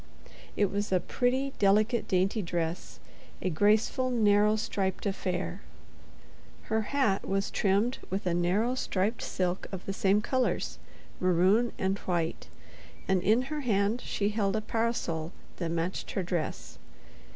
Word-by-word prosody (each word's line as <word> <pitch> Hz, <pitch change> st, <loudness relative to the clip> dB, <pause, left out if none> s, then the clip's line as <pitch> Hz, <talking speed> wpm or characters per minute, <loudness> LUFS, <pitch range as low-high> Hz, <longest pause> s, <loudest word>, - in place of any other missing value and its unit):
It 205 Hz, -2 st, +2 dB
was 205 Hz, +1 st, -2 dB
a 185 Hz, -, +4 dB
pretty, 260 Hz, +6 st, 0 dB
delicate, 215 Hz, +4 st, +3 dB
dainty 190 Hz, +4 st, +1 dB
dress, 170 Hz, -1 st, -3 dB, 0.4 s
a 185 Hz, -, -1 dB
graceful, 215 Hz, +8 st, +2 dB
narrow 210 Hz, -3 st, +4 dB
striped 195 Hz, -3 st, -2 dB
affair. 190 Hz, -1 st, -2 dB, 1.0 s
Her 220 Hz, 0 st, 0 dB
hat 260 Hz, -9 st, +1 dB
was 195 Hz, 0 st, 0 dB
trimmed 205 Hz, +6 st, +1 dB
with 190 Hz, +1 st, -3 dB
a 175 Hz, -, +1 dB
narrow 185 Hz, +8 st, +1 dB
striped 215 Hz, -3 st, -1 dB
silk 180 Hz, 0 st, -2 dB
of 190 Hz, -2 st, -6 dB
the 195 Hz, -, -3 dB
same 195 Hz, +1 st, +3 dB
colors—maroon 210 Hz, -3 st, 0 dB
and 190 Hz, +1 st, 0 dB
white—and 175 Hz, +2 st, -3 dB
in 220 Hz, +6 st, +3 dB
her 300 Hz, +3 st, -4 dB
hand 215 Hz, -1 st, +1 dB
she 205 Hz, 0 st, -1 dB
held 205 Hz, -2 st, 0 dB
a 215 Hz, -, 0 dB
parasol 210 Hz, -8 st, -2 dB, 0.2 s
that 170 Hz, -2 st, -2 dB
matched 170 Hz, +2 st, -2 dB
her 190 Hz, -, -1 dB
dress. 175 Hz, -3 st, -4 dB
200 Hz, 130 wpm, -29 LUFS, 185-220 Hz, 1.0 s, a